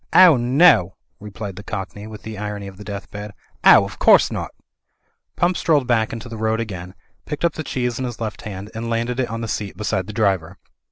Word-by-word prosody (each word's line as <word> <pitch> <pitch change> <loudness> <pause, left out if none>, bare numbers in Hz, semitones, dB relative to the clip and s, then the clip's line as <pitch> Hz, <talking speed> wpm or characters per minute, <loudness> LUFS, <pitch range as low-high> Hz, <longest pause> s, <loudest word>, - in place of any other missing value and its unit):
"Ow 180 -4 +9
no!" 125 - +4 0.2
replied 105 -2 -7
the 100 - -8
cockney, 100 +1 -6
with 110 -1 -10
the 110 -1 -6
irony 105 0 -5
of 95 -1 -10
the 105 - -10
deathbed. 100 0 -7 0.3
"Ow, - - +8
of - - -8
cotwse - - +6
not" - - -3 0.9
Pump 175 +1 +2
strolled 150 -5 +2
back 115 -3 +1
into 115 +1 -6
the 115 -1 -7
road 110 +1 0
again, 95 -5 -6 0.3
picked 150 +2 -2
up 170 - +2
the - - -5
cheese 125 -4 -2
in 130 - -2
his 120 -2 -6
left 110 -2 -4
hand, 100 0 -7
and 115 +1 -4
landed 115 +2 -1
it 125 - 0
on 115 +1 -4
the 115 - -3
seat 105 -2 -4
beside 95 -3 -1
the - - -5
driver. 95 -5 0
110 Hz, 215 wpm, -21 LUFS, 100-120 Hz, 0.9 s, Ow